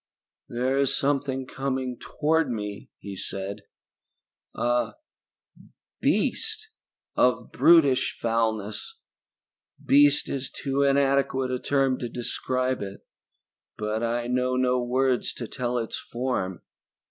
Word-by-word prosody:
"There 130 +3 0
is 140 -2 +2
something 135 -1 0
coming 130 -1 -3
toward 160 -1 +1
me," 105 -4 -5
he 100 -1 -8
said. 100 +2 -5 0.9
"A 120 0 0 1.0
beast 440 -1 0 0.5
of - - +2
brutish 155 -6 +5
foulness! 110 -2 -1 0.9
Beast 145 +1 +5
is 135 -1 -3
too 135 0 -2
inadequate 135 -1 +2
a 125 - -1
term 135 -2 +1
to 120 - -4
describe 130 +2 -1
it, 100 -1 -7 0.7
but 105 +1 -2
I 120 +1 -1
know 125 +1 +1
no 125 0 +2
words 125 +1 +1
to 120 - -6
tell 125 0 -2
its 115 -2 -2
form. 120 -7 -3
130 Hz, 110 wpm, -26 LUFS, 115-135 Hz, 1.0 s, brutish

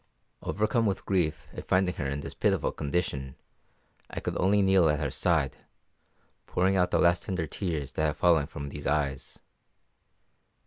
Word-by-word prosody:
Overcome 110 +2 +1
with 100 - -2
grief 90 -6 0
at - - -8
finding 95 -1 +2
her 75 - -2
in 70 +1 -3
this - - -6
pitiful - - +1
condition, 70 -4 -2 0.7
I - - -5
could - - -4
only 100 +2 +3
kneel 95 -4 +4
at 75 0 +1
her 75 -3 -2
side, 75 -8 +1 0.9
pouring 95 +2 +1
out 90 -1 +3
the - - +2
last 85 0 +3
tender 90 -5 -2
tears 80 -3 -3
that 80 - -1
have 75 - -3
fallen 80 -5 +3
from 70 -2 -7
these 75 +1 -6
eyes. 70 -3 -1
80 Hz, 165 wpm, -28 LUFS, 70-95 Hz, 0.9 s, kneel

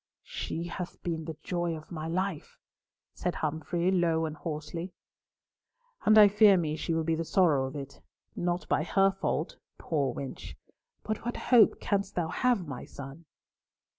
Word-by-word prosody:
"She 165 - -4
hath 175 +1 -6
been 165 -2 -3
the 160 -2 -6
joy 175 -2 -1
of 155 - -13
my 160 -2 -4
life," 180 -1 -3 0.6
said 180 - -2
Humfrey, 160 +4 -1
low 165 -3 +2
and 155 -1 -4
hoarsely. 165 +3 -5 1.1
"And 215 - +6
I 210 -1 +10
fear 205 -1 +6
me 155 -3 -1
she 165 +1 -2
will 165 - +1
be 165 +1 0
the 165 +1 -1
sorrow 160 -5 +3
of 135 - -8
it. 140 -1 -8 0.3
Not 175 0 -1
by 145 0 +2
her 195 +3 +3
fault, 195 - -2 0.2
poor 145 -5 -1
wench, 135 -2 -7 0.5
but 215 0 -3
what 240 +1 -3
hope 235 -4 +5
canst 200 -1 -1
thou 170 -2 0
have, 235 0 +1
my 140 -3 -6
son?" 140 +4 -10
170 Hz, 165 wpm, -29 LUFS, 155-190 Hz, 1.1 s, I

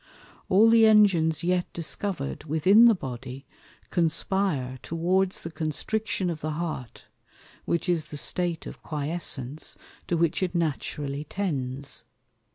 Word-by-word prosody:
All 205 +4 +6
the 225 -1 +6
Engines 185 -8 +4
yet 180 0 0
discover'd 170 -3 -4
within 185 +9 +5
the 230 -2 +7
Body, 130 -3 -7 0.5
conspire 165 -6 0
towards 180 +3 0
the 165 - -5
Constriction 180 +4 -2
of 155 -2 -6
the 155 0 -2
Heart, 155 -7 -5 0.6
which 170 - -1
is 165 -4 0
the 150 - -6
State 170 +2 -1
of - - -9
Quiescence, 150 -2 -2 0.3
to 175 - +1
which 170 +1 +1
it 180 -2 -1
naturally 150 -2 -2
tends. 140 -9 -3
165 Hz, 125 wpm, -26 LUFS, 145-185 Hz, 0.6 s, the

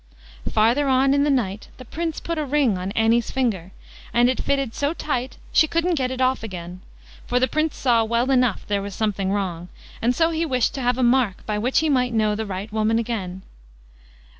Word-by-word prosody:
Farther 235 +7 +3
on 265 +1 +3
in 280 0 +3
the - - +1
night 215 -7 -1
the 255 - -11
Prince 325 +5 -4
put 335 -1 -3
a - - 0
ring 280 -6 +1
on 185 +1 -4
Annie's 225 +1 +2
finger, 210 -9 -1 0.4
and 240 +1 +4
it 260 - -3
fitted 275 -4 -1
so 285 +3 -1
tight 260 -5 -3 0.2
she 315 - +5
couldn't 335 +3 0
get 260 -5 0
it 260 0 -5
off 260 0 +1
again; 180 -4 -7 0.5
for 245 - +1
the 255 - +2
Prince 310 +1 -1
saw 235 -3 +3
well 235 +4 0
enough 250 -5 +2
there 205 -1 -1
was 200 -1 -6
something 200 -3 -1
wrong, 180 -4 -3 0.3
and 245 +2 +1
so 330 0 +2
he 325 0 -1
wished 255 -6 0
to 270 - -4
have 245 0 +1
a 260 - +1
mark 240 -6 +2
by 210 -1 -2
which 250 +7 +2
he 320 - +1
might 250 -5 +1
know 215 -1 +2
the 220 +1 -3
right 200 +2 -6
woman 220 +1 +1
again. 195 -6 -3
240 Hz, 215 wpm, -22 LUFS, 210-270 Hz, 0.5 s, she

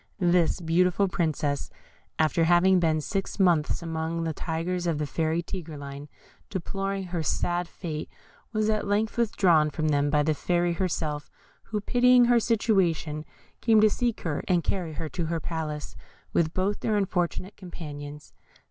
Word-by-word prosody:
This 175 -2 +2
beautiful 180 +4 +2
Princess, 155 -5 -1 0.5
after 160 +1 +2
having 180 +2 +5
been 160 -2 +2
six 195 +6 -3
months 170 -4 +2
amongst 165 0 -2
the 160 - -1
tigers 175 +3 -2
of 165 -3 +1
the 150 - -1
Fairy 160 +3 -1
Tigreline, 145 -6 -7 0.4
deploring 195 +1 -3
her 175 -2 -3
sad 175 +3 0
fate, 155 -4 -6 0.4
was 215 -1 0
at 215 -1 0
length 210 +2 0
withdrawn 180 -9 +3
from 155 +1 -1
them 145 -1 +2
by 150 0 +3
the 155 +1 +2
Fairy 175 +2 0
herself, 160 -5 -2 0.4
who 215 - -2
pitying 245 +3 +5
her 240 0 +5
situation, 185 -9 +1 0.4
came 225 -2 +5
to 215 0 +5
seek 240 0 -1
her 155 -4 -2
and 175 -2 +2
carry 175 -5 -2
her 160 - -4
to 170 0 -3
her 165 0 -1
palace, 155 -2 -4 0.4
with 160 -2 +2
both 190 +4 -1
her 215 -1 +1
unfortunate 185 0 -1
companions. 150 -5 -9
170 Hz, 155 wpm, -27 LUFS, 155-195 Hz, 0.5 s, having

